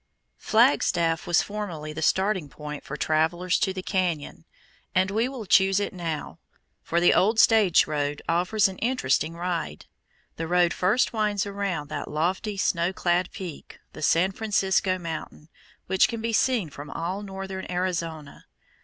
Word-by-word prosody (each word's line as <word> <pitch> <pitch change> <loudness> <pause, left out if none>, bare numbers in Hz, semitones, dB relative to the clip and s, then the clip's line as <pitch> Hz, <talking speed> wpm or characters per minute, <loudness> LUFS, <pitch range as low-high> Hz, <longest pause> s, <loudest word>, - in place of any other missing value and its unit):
Flagstaff 175 - +2
was 175 -1 +3
formerly 175 -8 -5
the 160 - -6
starting 190 -2 +1
point 150 0 -8
for 150 - -6
travellers 170 +4 +1
to 190 - +1
the 185 -1 -6
cañon, 180 -7 -2 0.5
and 185 +1 +2
we 225 +5 +1
will 255 -5 -7
choose 190 +1 +4
it 205 - -3
now, 165 -4 -5 0.4
for 170 - 0
the 175 - +5
old 220 +4 +3
stage 215 -8 +5
road 145 -1 -2
offers 185 +5 +2
an 190 -1 -8
interesting 245 -9 0
ride. 170 - -4 0.5
The 165 - -3
road 175 0 +3
first 210 +8 +1
winds 210 -3 0
around 195 -7 -3
that - - -5
lofty 185 +7 -1
snow 175 -1 +1
clad 180 -1 0
peak, 175 -6 -8 0.2
the - - -10
San 170 +5 +3
Francisco 195 -2 +1
Mountain, 165 -2 -7 0.4
which 190 0 +3
can 230 - -5
be 230 +1 -2
seen 220 - +1
from 145 +2 -9
all 180 +4 -4
northern 195 -1 -6
Arizona. 170 -5 -3
185 Hz, 155 wpm, -25 LUFS, 165-200 Hz, 0.5 s, the